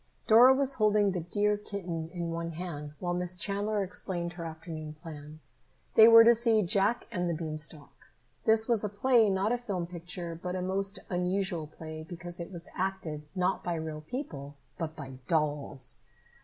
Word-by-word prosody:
Dora 240 +3 +8
was 275 0 +1
holding 210 -3 +3
the 185 - -2
dear 205 +5 +1
kitten 175 -6 -5
in 170 -2 -4
one 165 0 -4
hand 155 -4 -6
while 175 -1 -2
Miss 180 0 -1
Chandler 205 +2 0
explained 175 -2 -2
her 175 -1 -7
afternoon 160 -1 -7
plan. 155 -1 -10 0.5
They 220 0 +9
were 230 0 +10
to 235 +1 +7
see 230 -2 +4
"Jack 200 +6 +1
and 180 -5 -1
the 170 - -1
Beanstalk." 155 -2 -6 0.5
This 220 0 +4
was 230 -3 +2
a 210 - 0
play, 225 +1 +4
not 195 +3 +1
a 245 - +1
film 195 -7 -3
picture, 175 0 -6
but 180 +2 -5
a 185 - -2
most 195 +2 0
unusual 180 -2 -1
play, 155 0 -8
because 175 +1 -6
it 170 +2 -6
was 175 -2 -4
acted, 175 -6 -3
not 185 +1 0
by 175 - -1
real 160 -1 -5
people, 155 - -6 0.2
but 160 -2 -3
by 135 -3 -9
dolls! 145 -4 -1
180 Hz, 175 wpm, -30 LUFS, 160-205 Hz, 0.5 s, were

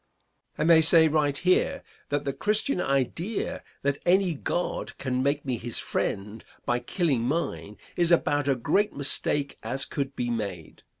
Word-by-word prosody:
I - - 0
may 165 0 +6
say 160 0 +6
right 145 -2 +1
here 180 +4 +1 0.3
that 145 0 -1
the 140 - -1
Christian 210 - +1
idea 140 - -1 0.2
that 140 0 0
any 185 0 +3
God 175 +4 -3
can 130 -1 -1
make 140 +2 0
me 130 -3 -1
his 115 +1 -4
friend 105 +3 -3 0.2
by 120 0 +1
killing 140 - 0
mine 115 - -2 0.2
is 175 -1 +3
about 145 -4 +2
a 135 - +3
great 160 - +1
mistake 140 0 -2
as 135 +2 -2
could 140 -2 -4
be 120 -1 -2
made. 100 -8 -5
140 Hz, 160 wpm, -27 LUFS, 125-165 Hz, 0.3 s, may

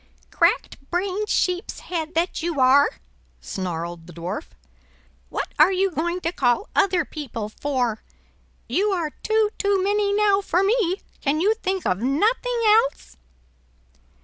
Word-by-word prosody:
"Crack - - +1
brained 385 +4 -1
sheep's 360 0 -1
head 325 -2 -4
that 335 +1 0
you 330 -3 -2
are!" 265 +3 +6 0.5
snarled 170 -2 -5
the 175 - -11
Dwarf; 170 +5 -5 0.8
"what - - -3
are 315 +5 +7
you 385 0 +1
going 345 +2 -2
to 335 - -1
call 260 - +1
other 365 -4 +3
people 230 -8 -6
for? 245 -3 -2 0.7
You 410 +3 +1
are 335 -5 -1
two 435 -1 +2
too 400 -2 +2
many 405 +1 +1
now 405 -1 +3
for 370 -1 +1
me; 400 -3 +1 0.2
can 290 +1 0
you 405 +6 +3
think 380 -4 -3
of 185 - +1
nothing 435 - +1
else?" 445 - +2
355 Hz, 140 wpm, -23 LUFS, 275-405 Hz, 0.8 s, are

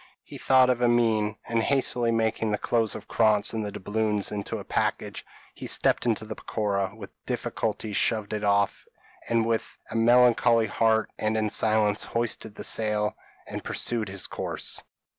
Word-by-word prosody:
He - - -10
thought 130 -1 +5
of 125 -1 -2
Amine; 115 -3 +2
and 115 -1 +1
hastily 125 -2 +1
making 115 -1 0
the 105 - 0
clothes 115 0 0
of - - -9
Krantz 110 -2 +3
and 110 -1 -2
the 105 - -4
doubloons 105 +1 -1
into 100 -1 -4
a - - -7
package, - - -2 0.3
he - - -8
stepped - - +2
into 110 -1 0
the 110 - -5
peroqua, 100 -2 -2
with 105 -3 -10
difficulty 105 - -3
shoved 110 0 +1
it 105 0 -3
off, 100 -1 +1 0.5
and 115 -1 +2
with 115 -1 -2
a - - -5
melancholy 120 0 +4
heart, 110 0 +1
and 110 +1 0
in 110 -1 0
silence, 110 -1 +2
hoisted 115 -2 -3
the - - -7
sail, 105 -1 +1 0.3
and - - -6
pursued 115 -4 -2
his 100 0 -3
course. - - -4
110 Hz, 165 wpm, -26 LUFS, 105-115 Hz, 0.5 s, thought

